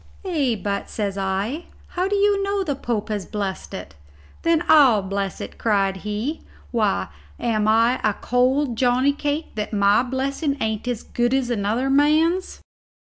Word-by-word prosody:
"Ay, 290 -10 +1
but," 200 -1 -2
says 200 -3 -3
I, 200 - -2 0.2
"how 365 +1 -1
do 410 - 0
you 405 0 +3
know 395 0 0
the 300 -6 -1
Pope 235 -5 -3
has 210 -3 -3
blessed 200 -3 -4
it?" 70 - -8 0.5
"Then 335 0 +2
I'll 260 -10 +6
bless 195 0 -3
it," - - -8
cried 195 -3 +1
he; 210 +10 -3 0.3
"why, 215 - 0 0.3
am 215 -2 0
I 230 +3 +3
a 215 -2 +2
cold 255 +1 +1
Johnny 255 +3 +3
cake 295 +2 -3
that 210 0 -4
my 200 +1 +4
blessing 275 +3 -2
ain't 220 +1 -2
as 245 -3 -2
good 240 +2 0
as 255 -2 0
another 225 +4 0
man's?" 310 +6 +2
245 Hz, 160 wpm, -22 LUFS, 210-290 Hz, 0.5 s, I'll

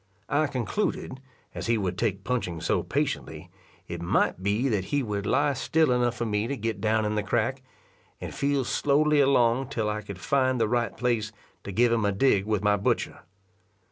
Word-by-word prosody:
I 150 +2 +2
concluded, 135 - -3 0.3
as - - -5
he 115 0 +2
would 95 -4 -2
take 100 -2 -1
punching 95 -9 -2
so - - +1
patiently, - - -3 0.4
it 85 -1 -6
might 85 +1 +1
be 105 +7 +1
that 105 -7 0
he 145 +6 0
would 105 -3 -3
lie 145 +2 +2
still 155 +1 +1
enough 120 -1 +1
for 120 - -2
me 105 0 -1
to 140 +2 -3
get 110 -3 -3
down 110 0 +1
in 105 - -1
the 105 - 0
crack, 120 +5 -1 0.6
and - - -6
feel 140 -1 0
slowly 145 +4 +2
along 130 -2 +3
till 110 -6 -1
I 105 0 -3
could 100 -3 -8
find 130 +3 +1
the 110 - +2
right 120 +1 -1
place 115 -3 0 0.3
to 100 - -5
give 120 +5 +3
him 115 -2 +1
a 100 - +2
dig 100 -1 +2
with 105 -2 0
my 105 0 +3
butcher. 100 - -1
115 Hz, 195 wpm, -27 LUFS, 105-135 Hz, 0.6 s, along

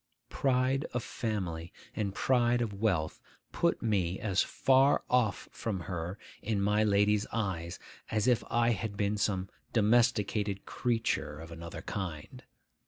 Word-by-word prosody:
Pride 130 +1 +1
of 125 - 0
family 90 -8 -3 0.2
and 100 -3 -2
pride 120 -2 +3
of 110 -3 -4
wealth 95 -7 0 0.3
put - - +1
me 95 -5 +1
as 95 -3 +1
far 135 +1 +3
off 120 -5 +2
from 100 -5 -3
her 90 +1 -4 0.2
in 105 -1 -1
my 105 +2 +3
lady's 105 0 +3
eyes 90 -6 -2 0.3
as 110 -2 +1
if 125 -3 +3
I 120 0 +3
had 105 -1 -3
been 105 0 +1
some 95 -2 0 0.3
domesticated 105 -3 +2
creature 115 - -1
of 80 +1 -9
another 85 0 -7
kind. 95 - -5
105 Hz, 135 wpm, -31 LUFS, 95-115 Hz, 0.3 s, pride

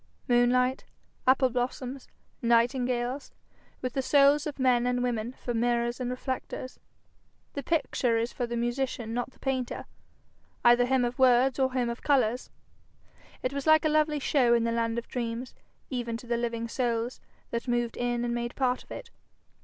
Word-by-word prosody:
Moonlight, 250 +1 +3 0.4
apple 260 0 +4
blossoms, 255 +2 -3 0.3
nightingales, 245 +2 +1 0.5
with 255 -1 -2
the 270 - 0
souls 280 +3 +4
of 295 - -5
men 250 -2 +3
and 250 0 0
women 235 -1 -1
for 245 - -5
mirrors 240 +1 0
and 250 -1 -2
reflectors! 255 0 -5 0.7
The 280 - -3
picture 255 -6 +1
is 230 +1 -1
for 245 - -2
the 235 0 -3
musician 240 -1 -2
not 245 +1 -2
the - - -25
painter, 260 -2 -2 0.8
either 240 +1 +6
him 260 -1 +2
of 240 +1 -4
words 255 +1 +4
or 260 -1 +2
him 250 -2 +1
of 235 0 -4
colours. 250 -4 +1 0.9
It 255 - -1
was 280 +1 -4
like 315 +1 +6
a - - +4
lovely 305 0 +2
show 260 -4 +3
in 235 - +2
the 230 - 0
land 230 0 0
of 235 - -4
dreams, 240 0 -4 0.4
even 240 -3 -2
to 245 - -12
the 240 0 0
living 235 -1 -2
souls 235 0 -2 0.3
that 235 +2 -3
moved 240 -1 0
in 240 0 -1
and 240 - -1
made 240 0 -3
part 255 -2 0
of - - -30
it. 470 -2 -8
245 Hz, 170 wpm, -28 LUFS, 235-260 Hz, 0.9 s, either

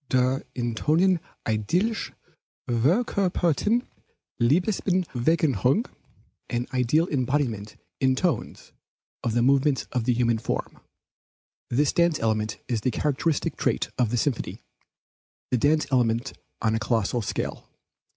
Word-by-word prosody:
"Der 130 +1 +2
in 120 -2 -1
Tönen 165 +9 +2 0.3
idealisch 170 - 0 0.6
verkörperten 180 - +1 0.6
Leibesbewegung," 160 - +2 0.6
[an 120 0 -1
ideal 130 +7 +2
embodiment 130 -6 -1 0.2
in 130 0 +3
tones 160 - -2 0.5
of 115 - -1
the 120 - +3
movements 135 +1 +3
of 125 -3 -1
the 125 - +3
human 115 -1 +1
form]. - - -4 0.9
This 145 +4 +2
dance 170 -2 +2
element 110 -1 0
is 115 -4 -1
the 130 - +1
characteristic 145 +4 -1
trait - - 0
of 120 -3 +3
the 120 - 0
symphony; 125 0 -2 0.9
the 125 - +2
dance 150 +4 +3
element 120 0 +1 0.3
on 110 -1 +2
a 110 - +1
colossal 115 +1 0
scale. 105 - -4
130 Hz, 115 wpm, -25 LUFS, 115-160 Hz, 0.9 s, in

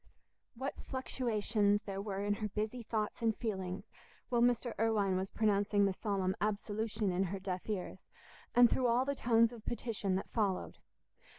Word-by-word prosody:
What 265 +4 -4
fluctuations 215 -5 0
there 195 -1 -4
were 200 -1 -3
in 205 0 +1
her 215 - 0
busy 215 +4 -3
thoughts 220 -1 -2
and 225 -2 +1
feelings, 190 -5 -4 0.4
while 240 -2 +2
Mr. 240 0 +2
Irwine 210 -4 +2
was 190 +1 -1
pronouncing 205 -1 +2
the 195 - +1
solemn 190 -2 -1
"Absolution" 210 0 -1
in 185 +2 +1
her 195 +2 -3
deaf 185 +1 -4
ears, 190 -2 -4 0.5
and 245 0 +9
through 250 +2 +1
all 240 +2 +3
the 280 - 0
tones 230 -3 +3
of 225 -3 -11
petition 220 -5 -2
that 190 - -3
followed! 200 -5 -1
210 Hz, 165 wpm, -34 LUFS, 195-230 Hz, 0.5 s, and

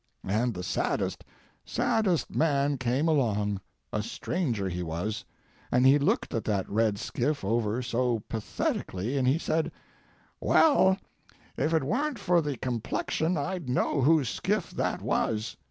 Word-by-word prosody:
And 115 +4 +1
the 90 - -5
saddest, - - -1 0.4
saddest 195 -7 0
man 145 -3 +2
came 130 +5 +1
along—a 105 - -1
stranger 115 - -2
he 90 -1 -3
was—and 105 +8 -3
he 135 +2 +7
looked 145 - +1
that 100 -3 -1
red 110 -1 +1
skiff 130 +3 -2
over 115 +2 0
so 120 -2 0
pathetically, 110 0 -2
and 130 -2 +1
he 135 +4 +4
said: 160 -1 0 0.7
"Well, 190 -12 +5 0.6
if 155 - 0
it 160 -3 +2
weren't 265 - 0
for 175 -4 +2
the 145 -4 -3
complexion 130 +8 -1
I'd 170 -1 -3
know 130 +3 +1
whose 150 -1 +4
skiff - - -1
that - - -2
was." 110 0 0
125 Hz, 130 wpm, -28 LUFS, 105-155 Hz, 0.7 s, he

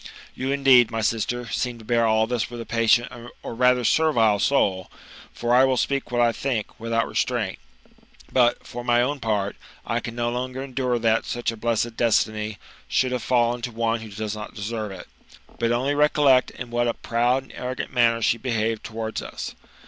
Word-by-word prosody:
You, 130 +1 -3
indeed, 135 -4 +5
ray 115 -1 -2
sister, 120 +3 -1
seem 125 +2 -2
to 110 - -14
bear 115 0 +2
all 110 0 +3
this 115 -2 -2
with 120 -1 -8
a 115 - -6
patient 115 +1 +2 0.3
or - - -5
rather 125 +1 +3
servile 115 -10 +3
soul, 95 -7 +1 0.4
(for 120 0 -1
I 125 +1 +6
will 130 -1 +2
speak 140 -1 -1
what 120 0 -1
I 120 -1 +4
think, 115 -2 -3
without 115 0 0
restraint), - - -1 0.7
but, 120 -2 +3
for 120 0 -7
my 120 0 +3
own 140 +3 -2
part, 105 -4 -1 0.3
I - - -1
can 115 - -7
no 120 0 -1
longer 130 +2 -4
endure 130 -2 -1
that 115 -1 +1
such 120 -1 -2
a - - -7
blessed 115 0 -1
destiny 110 -2 +1 0.3
should 130 -1 +1
have 125 -1 -1
fallen 120 0 +1
to 120 - -4
one 115 0 0
who 110 -1 -9
does 105 +1 -4
not 105 +1 -8
deserve 110 0 -4
it. 95 - -9 0.5
For 115 0 +1
only 130 +4 +1
recollect 145 -3 +4
in 120 -1 -9
what 120 0 +1
a 115 - 0
proud 120 +3 0
and - - -16
arrogant 125 +1 -5
manner 115 -2 +3
she 115 +1 +2
behaved 115 -3 -1
towards 110 0 -4
us. - - -6
120 Hz, 195 wpm, -24 LUFS, 115-125 Hz, 0.7 s, I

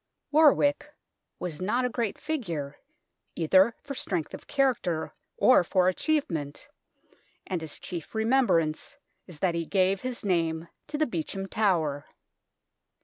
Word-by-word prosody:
War 305 0 +7
wick 290 +1 0 0.4
was 175 -3 -5
not 240 +7 +1
a - - +1
great 235 -3 -2
figure, 170 - -4 0.6
either 190 +7 +4
for 280 - -6
strength 175 - -2
of - - -9
character 255 - 0 0.2
or 255 - +6
for 180 +1 +2
achievement, 185 - -1 0.8
and 180 -3 -3
his 155 -3 -5
chief 175 +3 -6
remembrance 220 -10 +1 0.3
is 175 - -10
that 185 -3 +2
he 170 0 -1
gave 190 0 +2
his 250 -4 -4
name 165 -3 0 0.2
to 295 - -4
the 310 - +2
Beauchamp 195 - -4
Tower. 165 -10 +1
190 Hz, 135 wpm, -27 LUFS, 165-255 Hz, 0.8 s, War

